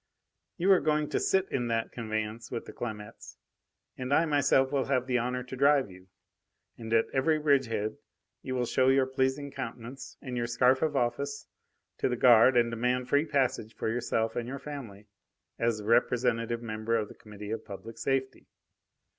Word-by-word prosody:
"You 185 +3 +3
are 190 - +7
going 150 0 0
to - - 0
sit 190 0 +2
in 120 -2 -1
that 115 -1 -1
conveyance 110 0 -4
with 120 - -5
the - - -10
Clamettes, 110 -2 -7 0.6
and 130 +1 -5
I 160 +4 +4
myself 145 -3 +3
will 140 -2 +1
have 130 -2 +1
the 125 -1 +1
honour 125 +1 -2
to 125 +1 -8
drive 140 -4 +3
you. 95 0 -15 0.7
And 110 -1 -8
at 115 0 +4
every 155 +4 +2
bridgehead 130 -8 +1 0.4
you 130 - -4
will 125 -1 0
show 130 +2 +2
your 135 0 +4
pleasing 130 +2 -1
countenance 125 0 -7
and 130 -2 -6
your 120 -1 -1
scarf 125 +2 +3
of 155 -2 0
office 140 +3 -1 0.5
to - - +1
the 125 - 0
guard 120 +1 +6
and 120 -1 +3
demand 125 +2 -1
free 145 +4 +3
passage 135 -6 0
for - - -2
yourself 115 -1 -1
and 120 -1 -3
your 135 +2 -5
family, 130 -8 -8 0.5
as 115 -2 +1
a 105 - -8
representative 115 0 +1
member 110 0 -2
of 110 -2 0
the - - -12
Committee 105 -1 -10
of 110 0 -3
Public 110 +3 -9
Safety. 130 +1 -2
125 Hz, 180 wpm, -29 LUFS, 115-135 Hz, 0.7 s, are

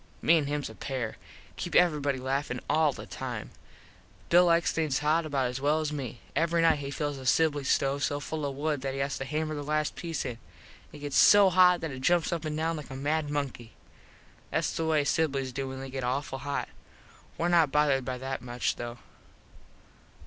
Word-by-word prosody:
Me 170 - +4
an 145 - -2
hims 145 0 -2
a 110 - -9
pair. 125 -1 -4 0.4
Keep - - -4
everybody 150 -6 +3
laffin 130 0 -2
all 155 -2 +3
the - - -9
time. - - -6 0.8
Bill 175 +1 +6
likes 170 -1 +3
things 155 -5 0
hot 155 +2 +1
about 140 -3 0
as 125 +1 -3
well 150 +2 +2
as 155 -1 -2
me. 125 -5 -5
Every 165 +3 +2
nite 160 -3 +4
he 140 -1 -5
fills 145 0 -3
the 130 - -9
Sibly 145 +1 +3
stove 140 +1 +1
so 145 - 0
full 155 +1 -4
of 140 -1 -2
wood 150 -1 -1
that 135 0 -3
he - - -4
has 140 0 -2
to 135 - -3
hammer 155 +2 -2
the 145 - -4
last 150 +1 -1
piece 165 -3 -4
in. 120 -2 -5 0.5
It - - -11
gets 145 -1 -3
so 205 -2 +7
hot 180 0 +5
that 160 -2 -3
it 130 -1 -7
jumps 175 +3 +2
up 165 -2 -3
and 155 0 -3
down 165 +1 -1
like 150 - -8
a 135 - -7
mad 150 +2 -1
monkey. 140 -6 -4 0.8
Thats - - 0
the 160 - -1
way 155 -2 +3
Siblys 140 -4 0
do 135 +1 -3
when 130 0 -6
they 135 0 -7
get 135 -1 -4
awful 135 +2 -2
hot. 140 0 -3 0.7
Were 170 - 0
not 170 -5 +4
bothered 145 -3 +3
by 130 0 -4
that 130 -1 -4
much 120 0 -2
though. 120 0 -6
145 Hz, 210 wpm, -29 LUFS, 135-160 Hz, 0.8 s, so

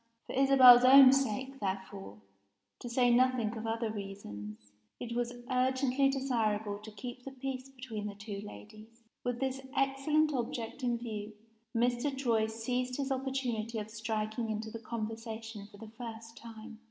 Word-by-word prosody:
For - - -7
Isabel's 260 -2 +8
own 265 0 +9
sake, 270 +1 -1
therefore 190 - -5 0.6
to 245 - -7
say 245 0 +3
nothing 245 -2 +2
of 225 0 -5
other 225 0 -1
reasons 105 - -8 0.3
it 235 -1 -5
was 240 0 -1 0.2
urgently 260 +1 +2
desirable 220 -6 -1
to 215 +1 -10
keep 245 +4 -8
the 270 - -6
peace 270 0 -5
between 245 -5 -6
the 205 - -7
two 205 -1 -6
ladies. 215 +2 -12 0.2
With 245 -1 -2
this 265 0 -2 0.2
excellent 290 +3 +2
object 235 0 -3
in 240 -2 0
view, 215 -3 -6 0.4
Mr. 245 +4 +1
Troy 230 -5 +2
seized 250 +3 -2
his 275 -1 -2
opportunity 255 -4 -2
of 215 0 -5
striking 220 +1 -3
into 220 0 -3
the 230 - -6
conversation 225 -1 -6
for 205 -1 -16
the 220 +1 -11
first 225 -1 -8
time. 225 -1 -11
235 Hz, 155 wpm, -32 LUFS, 215-255 Hz, 0.6 s, own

